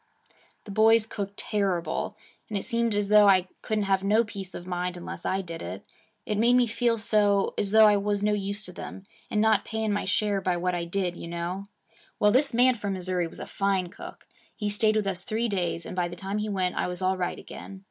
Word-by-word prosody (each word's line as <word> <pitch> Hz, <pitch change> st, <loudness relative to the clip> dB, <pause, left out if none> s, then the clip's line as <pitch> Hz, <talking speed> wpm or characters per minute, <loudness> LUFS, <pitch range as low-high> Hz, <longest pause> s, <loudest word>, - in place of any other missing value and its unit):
The 205 Hz, -, -9 dB
boys 220 Hz, +2 st, +5 dB
cooked 200 Hz, -2 st, -6 dB
terrible, 195 Hz, -5 st, -1 dB, 0.3 s
and 210 Hz, -, -2 dB
it 195 Hz, -, -3 dB
seemed 235 Hz, -3 st, 0 dB
as 205 Hz, -1 st, 0 dB
though 210 Hz, -1 st, +7 dB
I 185 Hz, -2 st, +4 dB
couldn't 215 Hz, -1 st, -1 dB
have 195 Hz, -1 st, +1 dB
no 215 Hz, +3 st, +4 dB
peace 200 Hz, -4 st, -8 dB
of 175 Hz, -, -7 dB
mind, 180 Hz, 0 st, -3 dB
unless 175 Hz, -, -6 dB
I 190 Hz, +1 st, 0 dB
did 170 Hz, -3 st, -7 dB
it. 90 Hz, +3 st, -7 dB, 0.4 s
It 210 Hz, -1 st, -1 dB
made 240 Hz, +2 st, +5 dB
me 250 Hz, -1 st, +5 dB
feel 230 Hz, +1 st, +1 dB
so 210 Hz, -3 st, +2 dB
as 200 Hz, -, 0 dB
though 220 Hz, +1 st, +7 dB
I 210 Hz, -1 st, +5 dB
was 205 Hz, 0 st, -1 dB
no 210 Hz, 0 st, +2 dB
use 200 Hz, +1 st, -3 dB
to 180 Hz, -, -3 dB
them 190 Hz, -, -8 dB, 0.3 s
and 210 Hz, -, 0 dB
not 215 Hz, -2 st, +3 dB
paying 220 Hz, -2 st, -2 dB
my 205 Hz, -, -1 dB
share 200 Hz, +1 st, +1 dB
by 185 Hz, -2 st, 0 dB
what 180 Hz, +1 st, -1 dB
I 175 Hz, -1 st, -2 dB
did, 180 Hz, 0 st, -2 dB
you 170 Hz, -, -8 dB
know. 170 Hz, +3 st, -4 dB, 0.5 s
Well, 210 Hz, -, +5 dB
this 275 Hz, +5 st, +4 dB
man 250 Hz, +2 st, +5 dB
from 205 Hz, -4 st, -3 dB
Missouri 180 Hz, -2 st, -1 dB
was -, -, -11 dB
a -, -, -5 dB
fine 195 Hz, -2 st, 0 dB
cook. -, -, -11 dB, 0.3 s
He 210 Hz, -2 st, -2 dB
stayed 215 Hz, +1 st, +2 dB
with 215 Hz, -1 st, +1 dB
us 185 Hz, -2 st, -1 dB
three 225 Hz, +3 st, -1 dB
days, 175 Hz, -5 st, -2 dB
and -, -, -6 dB
by 180 Hz, -1 st, 0 dB
the 175 Hz, -, -8 dB
time 195 Hz, +3 st, -3 dB
he 210 Hz, 0 st, -2 dB
went 185 Hz, -3 st, 0 dB
I -, -, 0 dB
was 180 Hz, +1 st, -4 dB
all 185 Hz, +1 st, +2 dB
right 180 Hz, -1 st, -2 dB
again. 195 Hz, -, -10 dB
200 Hz, 235 wpm, -27 LUFS, 185-215 Hz, 0.5 s, though